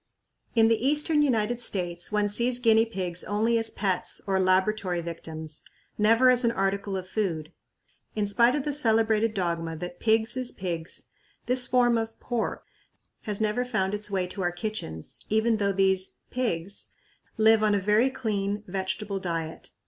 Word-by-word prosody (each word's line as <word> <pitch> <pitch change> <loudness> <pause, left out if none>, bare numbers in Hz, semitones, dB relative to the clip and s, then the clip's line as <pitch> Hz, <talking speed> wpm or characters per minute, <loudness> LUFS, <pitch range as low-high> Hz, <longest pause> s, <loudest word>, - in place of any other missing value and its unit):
In 225 -1 +6
the 225 0 +1
eastern 300 +2 +3
United 240 -4 +1
States 175 -6 -2
one 210 -1 +2
sees 240 +4 +1
guinea 225 -2 +4
pigs 180 -5 -3
only 225 +3 +1
as 225 0 +2
pets 190 -5 -1
or 190 -1 +1
laboratory 185 0 +2
victims; 160 -2 -6 0.3
never 230 +4 +5
as 250 0 +3
an 235 - +4
article 195 -2 -1
of 185 -1 -6
food. 175 -6 -2 0.6
In 210 -1 0
spite 235 +5 +3
of 290 - -1
the 295 - -1
celebrated 225 -4 +2
dogma 170 -3 -2
that 175 +1 -7
"Pigs 220 +2 +2
is 255 -1 -1
Pigs," 170 -3 -5 0.4
this 250 0 +1
form 240 -2 +3
of 225 0 -5
"pork" 240 -3 -3 0.6
has 210 -2 -2
never 220 +3 +1
found 210 -6 -1
its 210 0 -3
way 190 -2 0
to 185 +2 -6
our 175 -1 +1
kitchens, 175 - -5
even 220 +1 +2
though 200 -1 +1
these 190 -1 +1
"pigs" 200 -7 -2 0.5
live 220 0 +5
on 210 -1 +3
a - - +2
very 210 +6 +3
clean, 205 -5 -2
vegetable 195 +2 -3
diet. 165 -3 -4
210 Hz, 165 wpm, -27 LUFS, 185-230 Hz, 0.6 s, In